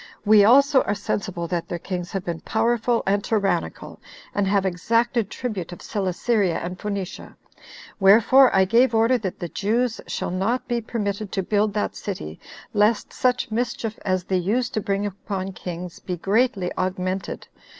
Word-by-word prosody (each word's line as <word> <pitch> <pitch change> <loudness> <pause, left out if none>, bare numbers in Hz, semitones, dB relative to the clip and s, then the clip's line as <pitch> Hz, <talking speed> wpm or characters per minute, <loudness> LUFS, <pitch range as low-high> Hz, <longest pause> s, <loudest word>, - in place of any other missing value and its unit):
We 210 -1 +7
also 275 +5 +6
are 205 - -1
sensible 195 -4 -3
that 175 -2 -2
their 175 - -3
kings 180 0 -5
have 195 -2 -3
been 170 -2 -3
powerful 230 +1 +1
and 200 +1 +1
tyrannical, 195 - -1 0.3
and 205 -1 0
have 195 0 +2
exacted 225 +4 +1
tribute 205 -10 -4
of 175 - -10
Celesyria 195 -1 0
and 180 +1 -5
Phoenicia. 200 -3 -5 0.6
Wherefore 230 +7 +6
I 190 0 +5
gave 230 +4 +3
order, 230 +3 +3
that 190 -5 -4
the 175 - -4
Jews 225 +6 -1
shall - - -3
not 200 +8 -1
be 240 -1 -1
permitted 210 -3 -3
to 195 - 0
build 205 +1 +1
that 210 - -1
city, 80 - -6 0.3
lest 210 +1 +2
such 250 -2 0
mischief 230 -1 -2
as 185 -2 0
they 185 +1 0
used 220 +7 0
to 215 - 0
bring 200 0 -1
upon 195 -1 -4
kings 180 -1 -7
be 180 -1 -5
greatly 200 0 +1
augmented." 185 +1 -3
200 Hz, 160 wpm, -23 LUFS, 185-230 Hz, 0.6 s, We